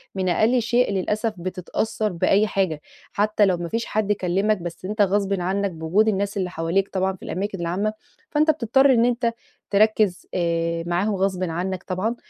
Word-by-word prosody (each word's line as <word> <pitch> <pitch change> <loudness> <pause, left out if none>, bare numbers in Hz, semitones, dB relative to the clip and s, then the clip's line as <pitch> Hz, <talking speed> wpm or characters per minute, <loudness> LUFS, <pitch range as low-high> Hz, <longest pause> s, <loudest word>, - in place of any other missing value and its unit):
من 185 -1 0
أقل 230 +7 +3
شيء، 240 0 +2
للأسف، 210 +4 -1
بتتأثَّر 185 +4 -2
بأي 195 +4 +2
حاجة، 185 -7 -1 0.3
حتى 210 0 +2
لو 185 -2 +2
ما 170 0 -5
فيش 230 +4 -2
حد 210 -1 -1
كلَّمك، 195 +2 +1
بس 175 0 -7
أنت 210 +2 -1
غصبًا 195 -2 +1
عنك، 195 +2 0
بوجود 170 +6 +1
الناس 200 -1 0
اللي 185 -2 -1
حواليك 175 +4 -1
طبعًا 190 0 -1
في - - -16
الأماكن 195 +1 -4
العامة، 190 +6 -1 0.4
فأنت 310 +1 +4
بتضطر 265 +1 +3
إن 235 0 +4
أنت 235 -1 +1 0.4
تركِّز، 210 -2 +2
آآ، 170 -1 0
معاهُم 190 +5 0
غصبًا 185 -2 -1
عنك 185 +2 -3
طبعًا. 200 +6 -2
195 Hz, 170 wpm, -23 LUFS, 180-215 Hz, 0.4 s, فأنت